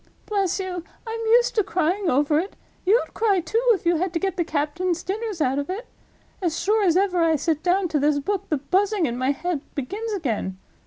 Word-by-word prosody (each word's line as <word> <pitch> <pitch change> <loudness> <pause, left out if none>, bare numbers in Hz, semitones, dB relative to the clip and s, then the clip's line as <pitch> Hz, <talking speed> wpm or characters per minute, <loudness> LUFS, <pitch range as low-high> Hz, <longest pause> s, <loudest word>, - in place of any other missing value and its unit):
Bless 395 -3 0
you, 365 -2 -4 0.2
I'm 455 0 -4
used 475 +2 +4
to 425 - +2
crying 365 0 0
over 295 +3 +3
it. 380 +5 -4 0.3
You'd 450 +6 +3
cry, 415 -4 +2
too, 440 +7 0
if 385 - -4
you 340 0 +3
had 355 +1 -1
to 335 - 0
get 385 0 -1
the 350 - +1
captain's 330 +3 -1
dinners 415 -2 -3
out 270 0 +2
of 285 - -4
it. 410 +6 -4 0.6
As 335 -3 -1
sure 420 +4 +2
as 355 -3 +4
ever 375 -2 +2
I 325 -1 +3
sit 310 +1 0
down 365 +2 +2
to 305 - +1
this 290 +1 +2
book 395 +7 -2
the 305 - +1
Buzzing 385 +6 +1
in 240 -4 -2
my 255 +2 0
head 310 +2 -1
begins 405 - -4
again. 225 - -2
360 Hz, 215 wpm, -24 LUFS, 305-400 Hz, 0.6 s, used